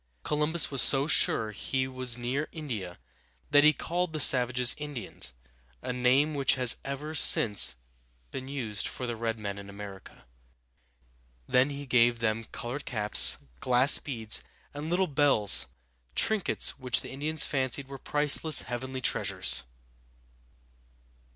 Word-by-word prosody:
Columbus 150 Hz, +2 st, +1 dB
was 135 Hz, -, +2 dB
so 140 Hz, 0 st, +4 dB
sure 110 Hz, -7 st, 0 dB
he 130 Hz, +5 st, -4 dB
was 130 Hz, -2 st, -2 dB
near 130 Hz, +5 st, -4 dB
India 110 Hz, -, -7 dB, 0.5 s
that 145 Hz, 0 st, +5 dB
he 150 Hz, -, +6 dB
called 175 Hz, +2 st, -4 dB
the 155 Hz, -, -4 dB
savages 125 Hz, -2 st, +5 dB
Indians, 145 Hz, -9 st, -2 dB, 0.5 s
a 125 Hz, -, -4 dB
name 130 Hz, +5 st, +1 dB
which 140 Hz, -2 st, +1 dB
has 125 Hz, -2 st, +4 dB
ever 140 Hz, +3 st, -7 dB
since 105 Hz, -, +4 dB, 0.6 s
been 130 Hz, -, -8 dB
used 120 Hz, -7 st, -3 dB
for 130 Hz, -, -6 dB
the 120 Hz, -1 st, -5 dB
red 115 Hz, 0 st, -4 dB
men 100 Hz, -2 st, -7 dB
in 100 Hz, 0 st, -12 dB
America. 100 Hz, -9 st, -12 dB, 1.2 s
Then 130 Hz, +3 st, +2 dB
he 140 Hz, 0 st, -8 dB
gave 120 Hz, -2 st, +2 dB
them 115 Hz, 0 st, -3 dB
colored 125 Hz, +7 st, -7 dB
caps, 105 Hz, -4 st, +3 dB, 0.2 s
glass 125 Hz, -, +5 dB
beads, 115 Hz, -6 st, 0 dB, 0.3 s
and 145 Hz, +2 st, -7 dB
little 180 Hz, +2 st, 0 dB
bells, 140 Hz, -, +1 dB, 0.5 s
trinkets 215 Hz, -8 st, 0 dB
which 125 Hz, -2 st, 0 dB
the -, -, -10 dB
Indians 150 Hz, +3 st, -2 dB
fancied 135 Hz, 0 st, -1 dB
were 135 Hz, -1 st, -10 dB
priceless 150 Hz, +2 st, +3 dB
heavenly 130 Hz, +2 st, -7 dB
treasures! 90 Hz, -, 0 dB
130 Hz, 135 wpm, -27 LUFS, 115-145 Hz, 1.2 s, he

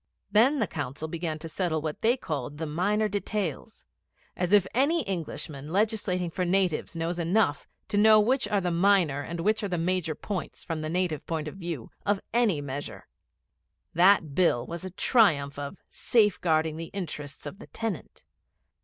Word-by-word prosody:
Then 250 Hz, +8 st, +5 dB
the 225 Hz, -, +2 dB
Council 145 Hz, -2 st, -5 dB
began 160 Hz, -1 st, -3 dB
to 160 Hz, +1 st, -7 dB
settle 160 Hz, -1 st, -1 dB
what 155 Hz, 0 st, -4 dB
they 235 Hz, +3 st, +3 dB
called 145 Hz, -, -4 dB
the 160 Hz, -, -3 dB
'minor 200 Hz, +8 st, +1 dB
details.' 200 Hz, -5 st, -4 dB, 0.5 s
As 180 Hz, 0 st, -1 dB
if 205 Hz, -3 st, +6 dB
any 290 Hz, +6 st, +2 dB
Englishman 155 Hz, -, -5 dB
legislating 195 Hz, -3 st, 0 dB
for 180 Hz, -, -2 dB
natives 180 Hz, -2 st, 0 dB
knows 165 Hz, +1 st, -2 dB
enough 170 Hz, -3 st, +1 dB, 0.2 s
to 205 Hz, -, 0 dB
know 215 Hz, +1 st, +7 dB
which 255 Hz, +5 st, +2 dB
are 205 Hz, -1 st, +1 dB
the 180 Hz, -1 st, -1 dB
minor 170 Hz, -5 st, +3 dB
and 170 Hz, +3 st, -5 dB
which 215 Hz, +5 st, +1 dB
are 205 Hz, -, -1 dB
the 180 Hz, -2 st, -2 dB
major 170 Hz, -2 st, 0 dB
points, 195 Hz, +3 st, -5 dB
from 165 Hz, -3 st, -4 dB
the 155 Hz, -, -3 dB
native 175 Hz, -3 st, -1 dB
point 160 Hz, -2 st, -2 dB
of 155 Hz, -, -6 dB
view, 170 Hz, -10 st, -5 dB
of 205 Hz, -1 st, +1 dB
any 225 Hz, -11 st, +2 dB
measure! 140 Hz, 0 st, -6 dB, 0.9 s
That 175 Hz, -4 st, +4 dB
Bill 155 Hz, -8 st, +2 dB
was 170 Hz, +1 st, -6 dB
a 185 Hz, -, -4 dB
triumph 160 Hz, -, +2 dB
of 145 Hz, +6 st, -6 dB
'safe 210 Hz, -4 st, +2 dB
guarding 160 Hz, -2 st, +1 dB
the 165 Hz, -, -5 dB
interests 150 Hz, -7 st, -6 dB
of 195 Hz, -, -7 dB
the -, -, -11 dB
tenant.' 225 Hz, -8 st, -5 dB
175 Hz, 175 wpm, -27 LUFS, 155-205 Hz, 0.9 s, know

